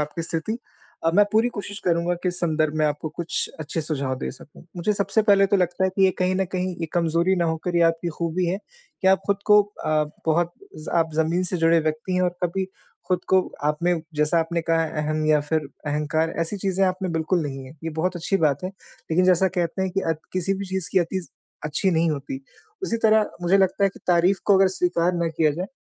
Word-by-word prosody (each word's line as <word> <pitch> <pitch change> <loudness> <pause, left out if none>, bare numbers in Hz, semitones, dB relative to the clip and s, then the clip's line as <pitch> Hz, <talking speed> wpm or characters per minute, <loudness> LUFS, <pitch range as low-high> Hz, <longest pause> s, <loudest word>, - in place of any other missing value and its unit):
आपकी 150 +3 -3
स्थिति 165 +8 -3 0.5
अब 165 - +2
मैं 205 +1 +6
पूरी 225 +3 +4
कोशिश 205 0 -4
करूँगा 170 0 +1
कि 180 - +1
इस 175 - -2
संदर्भ 155 -2 +1
में 155 - +2
आपको 150 +1 -2
कुछ 170 0 -1
अच्छे 155 +2 -3
सुझाव 140 -4 -2
दे - - -3
सकूँ। 150 - -15
मुझे 180 +5 +1
सबसे 200 +2 +1
पहले 200 -2 +5
तो 200 0 +2
लगता 180 +1 +1
है 190 - +2
कि 190 0 +2
ये 190 - +5
कहीं 185 0 +1
न 190 0 +1
कहीं 185 0 -1
ये 165 - -1
कमजोरी 170 +2 +2
ना 170 - +1
होकर 165 +2 -1
ये 170 - +4
आपकी 165 +1 +2
खूबी 170 +1 -1
है 185 +3 -1 0.4
कि 190 - +4
आप 190 - +4
खुद 200 -1 +2
को 210 0 +9
अ, 155 -7 -1 0.2
बहुत 170 +2 +2 0.2
ज 155 - -9
आप 165 -1 +2
ज़मीन 160 +3 +1
से 180 0 -2
जुड़े 165 0 +4
व्यक्ति 155 +4 -2
हैं 180 - +2
और 180 - +2
कभी 185 +2 0 0.4
खुद 180 -1 +1
को 190 0 +5 0.2
आपने 170 +4 +1 0.2
जैसा 150 +3 +2
आपने 170 +1 -1
कहा 165 0 +1
है - - -6
अहम 155 0 -1
या 150 -1 +4
फिर 155 +2 0 0.3
अहंकार, 150 +2 0
ऐसी 165 +5 -1
चीज़ें 195 0 +1
आपने 185 0 -1
बिल्कुल 165 +1 0
नहीं 135 -2 -5
है 130 - -11
ये 165 - -2
बहुत 180 +2 0
अच्छी 185 +3 0
बात 150 -3 +1
है। - - -1 0.4
लेकिन 180 +3 +3
जैसा 185 +1 +4
कहते 180 +1 -2
हैं 190 - -1
कि 195 - -1
अत 160 -1 -2
किसी 185 +1 0
भी 200 +1 -4
चीज़ 190 -3 -1
की - - +5
अति 175 +1 -2 0.4
अच्छी 155 +6 +1
नहीं 165 -1 +2
होती। 140 -2 -4 0.4
उसी 230 -11 0
तरह 215 -1 +4
मुझे 190 +3 +4
लगता 190 +1 +2
है - - +4
कि - - -15
तारीफ 180 +2 +3
को 200 - +5
अगर 190 0 +5
स्वीकार 180 -1 +1
ना 170 -1 0
किया 160 -1 +2
जाए 175 +6 -3
175 Hz, 230 wpm, -24 LUFS, 160-190 Hz, 0.5 s, को